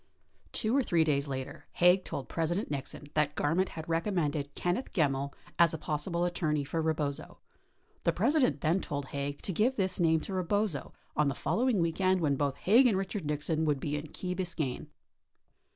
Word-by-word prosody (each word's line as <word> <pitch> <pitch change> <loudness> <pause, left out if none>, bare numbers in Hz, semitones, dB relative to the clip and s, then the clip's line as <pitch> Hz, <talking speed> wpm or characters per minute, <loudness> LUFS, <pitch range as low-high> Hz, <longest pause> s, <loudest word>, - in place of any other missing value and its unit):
53 - - -1
Two 225 +2 +1
or - - +4
three 170 -9 +2
days 145 -2 +1
later, 130 -1 -6
Haig 180 +1 +5
told 140 - -5
President 170 +5 -1
Nixon 140 +1 -5
that 150 -1 +1
Garment 170 +6 +1
had 160 -1 -7
recommended 165 -5 -1
Kenneth 180 +9 -1
Gemmill 140 -5 +1 0.3
as 170 -2 +5
a - - -3
possible 160 +3 -1
attorney 155 -4 0
for 160 +4 -2
Rebozo. 155 -3 -2 0.7
The - - +3
President 235 - +2
then 165 +5 +2
told 140 -2 -4
Haig 140 0 -4
to 190 - -1
give 235 +9 +2
this 190 -4 0
name 160 -2 +4
to 195 - -6
Rebozo 185 -3 -1 0.2
on 150 -1 +3
the 140 - 0
following 245 -3 +1
weekend 185 +3 +2
when 150 -4 +2
both 140 -1 -1
Haig 235 +7 +5
and 220 - +2
President 195 -2 -3
Nixon 150 +2 -1
would 145 -3 +1
be 145 +2 -2
in 150 +1 -4
Key 180 +4 -4
Biscayne. 170 -8 -2
160 Hz, 185 wpm, -31 LUFS, 145-185 Hz, 0.7 s, Haig